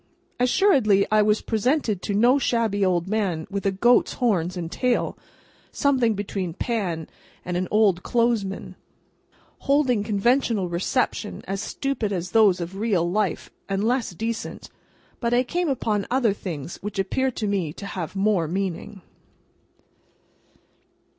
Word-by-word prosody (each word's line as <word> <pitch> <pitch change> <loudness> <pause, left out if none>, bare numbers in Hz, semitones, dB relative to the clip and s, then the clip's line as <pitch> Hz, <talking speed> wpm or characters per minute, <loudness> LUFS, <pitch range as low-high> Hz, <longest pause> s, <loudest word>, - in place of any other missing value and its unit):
Assuredly, 250 - +4
I 215 0 +5
was 210 +1 +2
presented 225 - 0
to 200 - -2
no 245 +6 +4
shabby 225 -6 +1
old 180 -2 +1
man 190 -7 -1
with 200 0 -2
a - - +2
goat's 240 +6 +3
horns 185 -7 0
and 170 -1 -5
tail 250 -1 0 0.6
(something 255 -6 +2
between 195 -4 -4
Pan 185 -9 -2 0.4
and 180 - -3
an 180 +1 -1
old 205 -4 +3
clothesman), 230 -5 -1 0.8
holding 275 -6 +2
conventional 215 -1 +1
receptions, 210 +5 -1
as 195 +1 -2
stupid 270 -6 -2
as 180 -2 -3
those 210 -5 +5
of 175 +3 -5
real 200 -6 +1
life 195 -1 -1 0.2
and 195 +1 0
less 245 +2 +1
decent; 225 +4 -5 0.5
but, 235 0 +1
I 250 - +3
came 345 +5 -1
upon 215 -6 -1
other 245 -5 +2
things 170 -6 -6
which 210 0 -7
appeared 255 +7 0
to 220 - -2
me 195 -6 -1
to 200 - -9
have 185 -3 -5
more 195 -4 +1
meaning. 190 +2 -4
205 Hz, 140 wpm, -24 LUFS, 190-240 Hz, 0.8 s, I